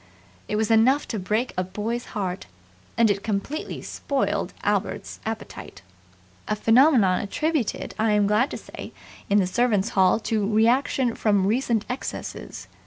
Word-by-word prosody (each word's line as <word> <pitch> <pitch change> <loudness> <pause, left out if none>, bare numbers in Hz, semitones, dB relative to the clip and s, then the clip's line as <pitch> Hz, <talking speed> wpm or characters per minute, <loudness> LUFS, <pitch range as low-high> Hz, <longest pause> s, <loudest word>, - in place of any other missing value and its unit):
It - - -2
was 220 +1 0
enough 250 +6 +4
to 220 - -2
break 215 +7 -1
a 185 - 0
boy's 215 +6 -4
heart; 190 -2 -3 0.5
and 230 -2 +5
it 200 0 -2
completely 220 +10 -3
spoiled 280 -2 -2
Albert's - - -2
appetite 225 0 -7 0.6
a 215 - 0
phenomenon 225 -4 +4
attributed, 295 +3 -2
I 220 -1 +2
am 210 -1 +3
glad 210 +7 +2
to - - -5
say, - - -10 0.4
in 205 - +4
the 195 - +4
Servants' 215 +1 +1
Hall 190 +2 +3
to 215 -2 -1
reaction 240 +3 +2
from 205 -4 +2
recent 230 0 +1
excesses. 250 +2 -6
220 Hz, 145 wpm, -24 LUFS, 205-245 Hz, 0.6 s, and